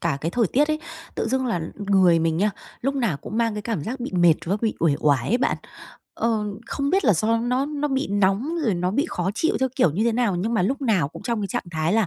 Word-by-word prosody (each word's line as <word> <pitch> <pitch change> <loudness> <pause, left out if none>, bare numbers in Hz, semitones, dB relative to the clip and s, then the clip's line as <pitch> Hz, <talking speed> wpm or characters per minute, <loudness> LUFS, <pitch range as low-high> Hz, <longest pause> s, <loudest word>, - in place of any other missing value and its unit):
cả 140 - -1
cái 165 - -2
thời 230 +3 +2
tiết 295 +4 +3
ấy, 310 0 0 0.4
tự - - -2
dưng 260 +2 0
là 225 -8 -1 0.2
người 190 -4 +4
mình 165 0 +1
nha, 205 +5 +2 0.3
lúc 275 +3 -1
nào 235 - 0
cũng 210 - -7
mang 230 -2 +1
cái 210 - -4
cảm 215 -8 -2
giác 250 +4 -4
bị 245 - -4
mệt 175 -3 +5
với 185 +4 0
bị 225 -2 0
uể 160 -3 +3
oải 140 -5 +2
ấy 240 - +2
bạn. 260 - +1 0.6
Ờ, 225 -2 0 0.2
không 280 0 -2
biết 385 0 +2
là 220 - +5
do 215 +6 +1
nó 250 +4 0
nó 295 0 -2
bị 270 +1 0
nóng 205 - +1
rồi 215 -6 +2
nó 180 +1 -1
bị 280 - 0
khó 180 +1 -1
chịu 325 - +1
theo 260 - +2
kiểu 250 - +4
như 195 +9 0
thế 235 - +2
nào, 225 -5 +1
nhưng 220 +7 -1
mà 215 - +2
lúc 270 +9 -1
nào 205 - +2
cũng - - -11
trong 235 -3 -1
cái 200 - -1
trạng - - -2
thái 160 0 0
là 220 -2 +3
220 Hz, 275 wpm, -23 LUFS, 180-255 Hz, 0.6 s, mệt